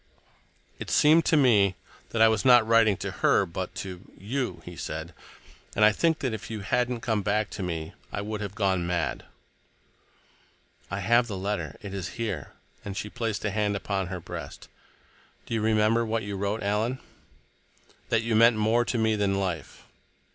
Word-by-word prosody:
"It - - -6
seemed 160 +3 +5
to 160 - +4
me 105 -9 +4 0.3
that 115 -1 +3
I - - +8
was 110 -2 +1
not 125 -3 +7
writing 115 -2 +5
it - - -17
to - - -3
her, - - +4
but 90 +2 -5
to 90 -2 -8 0.2
you" 125 +7 -3
he - - -9
said. - - -6 0.6
"And 105 - +5
I 105 - +7
think 160 +8 +1
that 130 -4 -1
if 110 - -6
you 110 -2 -5
hadn't 120 +2 0
come 110 -3 0
back 105 +2 0
to - - -6
me 80 -3 -4 0.2
I - - -3
would 105 +1 -4
have 100 -1 -5
gone 95 -4 +1
mad." 85 -1 -2 1.6
"I - - -3
have 120 +1 +3
the 100 -4 -4
letter. 100 +2 -3
It 100 -1 -7
is 95 -3 -5
here"—and 100 -2 -6
she 105 -1 -4
placed 115 -4 -3
a 105 - 0
hand 105 0 0
upon 100 -1 -2
her 90 0 -5
breast. 80 -4 -8 0.8
"Do - - -6
you 110 - 0
remember 110 +1 +3
what 115 0 -1
you 100 0 -4
wrote, 100 +2 -2
Alan?" 105 +5 0 1.1
"That 115 -1 +2
you 115 -1 0
meant 115 +1 +6
more 110 +3 +3
to 120 - -2
me 110 -1 +2
than 100 -2 +1
life." 95 -4 -4
105 Hz, 185 wpm, -27 LUFS, 100-115 Hz, 1.6 s, I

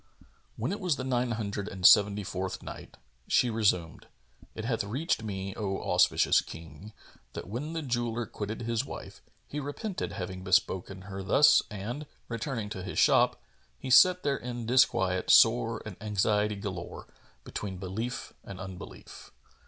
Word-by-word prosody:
When - - -2
it 205 - -3
was 180 -6 +1
the 130 - -5
Nine 125 -1 0
Hundred 100 -2 -4
and 95 -2 -5
Seventy 100 0 +6
fourth 95 0 -4
Night, - - -10 0.3
She 125 - +3
resumed, 100 -7 0 0.5
It 110 - -5
hath 115 -3 0
reached 130 - -1
me, 100 -3 -5
O 95 -3 -2
auspicious - - +3
King, 85 +6 -11 0.4
that - - -7
when 130 - -5
the 165 -1 -3
jeweller 120 -2 -1
quitted 105 +2 -6
his 115 +1 -1
wife, - - -9 0.3
he 150 - -5
repented 175 +8 -4
having 95 0 -6
bespoken 95 -1 0
her 95 0 -7
thus 140 +10 +5
and, 115 +8 -6 0.2
returning 115 -2 -3
to 95 -2 -6
his 90 0 -6
shop, - - +4 0.4
he 130 - -6
sat 180 +7 +7
there 140 -1 +1
in 120 -1 -6
disquiet 95 -7 +2
sore - - +5
and - - -8
anxiety 105 0 +1
galore, 95 -3 -6 0.4
between 95 -3 -5
belief 105 +7 -5
and 95 -2 -9
unbelief. 95 -1 -10
105 Hz, 155 wpm, -29 LUFS, 95-125 Hz, 0.5 s, sat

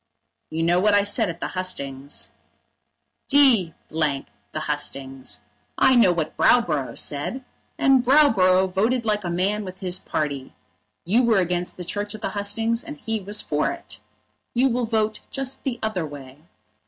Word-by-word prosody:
"You 160 +1 -2
know 175 +2 +3
what 205 +2 +4
I 205 - +4
said 205 0 +1
at 170 0 -6
the - - -3
hustings." 140 -7 -3 1.0
"D 245 - +5
the 155 -3 +1 0.5
hustings. 135 -5 -3 0.4
I 265 0 +5
know 220 -7 +6
what 160 -3 -2
Browborough 155 - +2
said, 155 - -3 0.3
and 265 -2 +4
Browborough 190 -10 +4
voted 230 +5 +1
like 210 -1 0
a 175 - -3
man 195 +5 0
with 185 -1 -9
his 185 -1 -1
party. 140 -3 -3 0.5
You 215 +8 +3
were 235 -3 +3
against 180 -1 -1
the 180 - -6
Church 205 +3 -3
at 215 - -11
the - - 0
hustings, 225 +3 0
and 300 -2 -8
he 225 -5 -2
was 205 +2 -3
for - - 0
it. - - -8 0.6
You 260 +3 +4
will 245 -1 -1
vote 220 -1 0
just 270 -1 -4
the 255 -3 -2
other 190 -7 -1
way. 145 +1 -12
195 Hz, 160 wpm, -23 LUFS, 165-230 Hz, 1.0 s, know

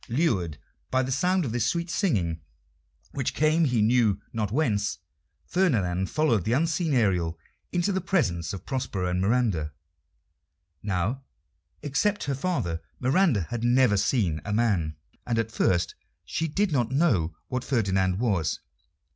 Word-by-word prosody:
Lured 115 - 0 0.3
by 130 0 +2
the 130 - -3
sound 180 +6 +1
of 120 - -3
this 120 0 0
sweet 170 0 -1
singing, 95 - 0 0.7
which 135 -3 -2
came 155 +2 +3
he 120 -6 +2
knew 110 -3 +3
not 105 -3 -2
whence, 105 - 0 0.5
Ferdinand 95 - +1
followed 150 - +2
the 110 - 0
unseen 160 +1 +1
Ariel 90 -8 +1 0.3
into 175 +3 +1
the 190 -1 -1
presence 110 - 0
of 95 -3 -7
Prospero 125 -9 -2
and 90 +1 0
Miranda. 100 - +1 1.1
Now, 105 +6 -1 0.6
excepting 145 +2 0
her 135 - -7
father, 90 - -1 0.2
Miranda 135 - +3
had 120 -1 -3
never 120 -2 +4
seen 95 - +1
a 100 - -4
man, 100 -9 +1 0.3
and 120 -2 0
at 115 0 -1
first 90 -5 +1 0.3
she 165 - -2
did 195 +5 0
not 120 -5 +1
know 110 - +2
what 125 0 -2
Ferdinand 95 -6 +1
was. 95 - 0
120 Hz, 145 wpm, -26 LUFS, 95-145 Hz, 1.1 s, never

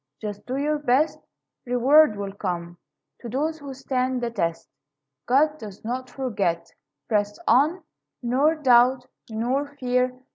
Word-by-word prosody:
Just 205 -1 -7
do 255 +1 -2
your 300 +2 0
best. 290 +3 +2 0.5
Reward 255 +2 +5
will 200 -1 -4
come 175 -3 -4 0.4
To 235 - -8
those 310 +6 -2
who 285 -2 -8
stand 255 -1 -1
the 240 -1 -2
test; 170 -7 -2 0.6
God 300 +4 +3
does 210 -3 -10
not 255 +2 -3
forget. 200 -11 -1 0.4
Press 205 -2 0
on, 305 +9 +3 0.4
Nor 270 +7 +2
doubt, 255 -3 +4 0.2
nor 245 +6 -1
fear. 250 -1 0
250 Hz, 135 wpm, -24 LUFS, 220-280 Hz, 0.6 s, Reward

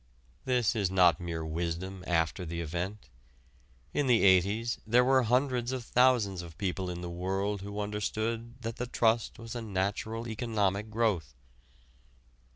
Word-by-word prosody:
This 125 -3 +2
is 100 -4 +1
not 90 -1 +4
mere 85 -2 -4
wisdom 85 +4 -3
after 80 +1 +1
the 85 0 -4
event. 90 +6 -4 0.9
In 145 - +1
the 120 -3 +4
'80's 100 +5 +3
there 120 +3 +4
were 130 0 +5
hundreds 125 0 +1
of 130 -2 -3
thousands 120 -8 +3
of 85 -2 -11
people 95 -1 -2
in 90 0 -5
the 90 - -5
world 95 +3 -2
who 100 +1 -6
understood 110 +3 -2
that 115 0 -4
the 125 - -3
trust 115 -1 +1
was 115 -1 -8
a 120 - -4
natural 110 +3 -2
economic 105 -3 -1
growth. 105 - 0
105 Hz, 150 wpm, -30 LUFS, 90-115 Hz, 0.9 s, were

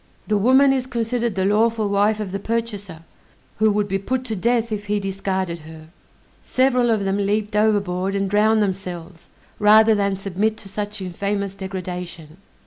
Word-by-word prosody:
The 215 - 0
woman 260 +6 +5
is 260 -1 -1
considered 235 -2 -1
the 190 -1 0
lawful 220 +1 +2
wife 205 +2 +2
of 205 -3 -4
the 195 - -3
purchaser, 205 -6 -4 0.6
who 220 0 +4
would 205 0 0
be 195 0 -1
put 255 +6 -2
to 225 -3 -3
death 230 +3 0
if 205 -1 -4
he 210 0 0
discarded 190 -3 -3
her. 155 0 -13 0.5
Several 255 -2 +2
of 215 -3 +1
them 195 +1 0
leaped 210 +1 -1
overboard 200 -3 +1
and 195 0 0
drowned 215 +2 +3
themselves, 180 -3 -5 0.3
rather 215 +1 +6
than 200 -2 +1
submit 195 +3 -1
to 200 - -12
such 205 0 -5
infamous 200 +2 -3
degradation. 180 -4 -7
205 Hz, 165 wpm, -21 LUFS, 190-220 Hz, 0.6 s, rather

